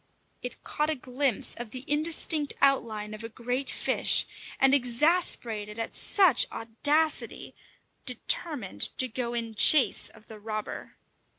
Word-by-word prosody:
It 250 - -9
caught 300 +1 -2
a 315 - -1
glimpse 255 -2 +1
of 240 -2 -9
the 255 +3 -9
indistinct 305 0 +1
outline 220 -6 0
of 215 +1 -9
a 225 - -7
great 250 +4 -4
fish, - - +2 0.3
and 270 0 +3
exasperated 240 -5 +1
at 225 - -5
such 375 -9 +3
audacity, 290 +8 -1 0.5
determined 245 - -2
to 255 - +2
go 240 0 -5
in 230 -1 -5
chase 270 +5 +5
of 215 - -20
the 220 -1 -13
robber. 215 0 -7
250 Hz, 130 wpm, -26 LUFS, 225-290 Hz, 0.5 s, chase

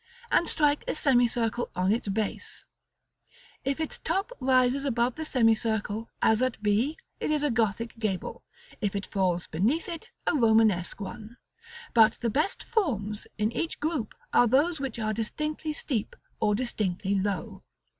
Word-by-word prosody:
and 340 - +3
strike 295 -1 +2
a - - -1
semicircle 240 -4 +2
on 185 +2 +2
its 225 0 0
base; 205 +1 -3 1.0
if 275 +3 -1
its 315 - -3
top 390 +8 -1
rises 255 +1 +3
above 245 -2 +1
the 315 - -5
semicircle, 225 -4 +1
as 220 +1 +4
at 255 -2 0
b, 220 +9 +2 0.2
it - - -2
is 300 -1 +1
a 295 - +2
Gothic 230 0 -1
gable; 205 -5 -3 0.4
if 205 -2 -1
it 200 - -2
falls 180 -3 0
beneath 230 - 0
it, 335 -3 -6 0.2
a - - +2
Romanesque 220 - +3
one; 215 +3 -8 0.6
but 225 -1 +6
the 235 -2 -2
best 305 - 0
forms 220 - -1
in 215 +1 +1
each 330 +6 -2
group 295 -8 -2 0.2
are 245 - +6
those 295 +7 +3
which 270 -3 -4
are 215 -1 -1
distinctly 305 +8 -3
steep, 255 -7 -2 0.2
or 210 -1 +2
distinctly 205 -5 -1
low. 200 0 -2
230 Hz, 155 wpm, -28 LUFS, 210-280 Hz, 1.0 s, but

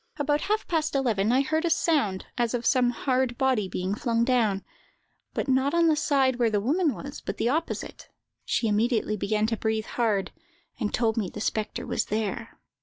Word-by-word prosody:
About 290 +1 +1
half 425 +2 -1
past 315 -4 0
eleven 225 -6 +1
I 260 +2 +4
heard 315 +4 0
a 340 - +1
sound 290 - +1
as 240 0 0
of 240 -1 -3
some 250 -2 +3
hard 255 0 0
body 255 -7 +1
being 185 +2 -2
flung 230 +1 0
down, 225 -6 +1 0.7
but - - -1
not 265 +3 +2
on 340 0 +4
the 310 - +4
side 270 -4 +2
where 240 -2 +3
the 210 -1 +1
woman 290 - +1
was, 280 +1 -8
but - - -4
the 235 - +1
opposite; 320 +5 -3 0.3
she 230 - 0
immediately 215 0 +1
began 210 +1 0
to 225 0 -1
breathe 220 0 -1
hard, 215 -5 0 0.5
and 215 -4 -1
told 225 -1 +1
me 205 -5 0
the 210 - -8
spectre 215 +3 -2
was 245 - -1
there. 220 +2 -3
240 Hz, 190 wpm, -26 LUFS, 215-275 Hz, 0.7 s, I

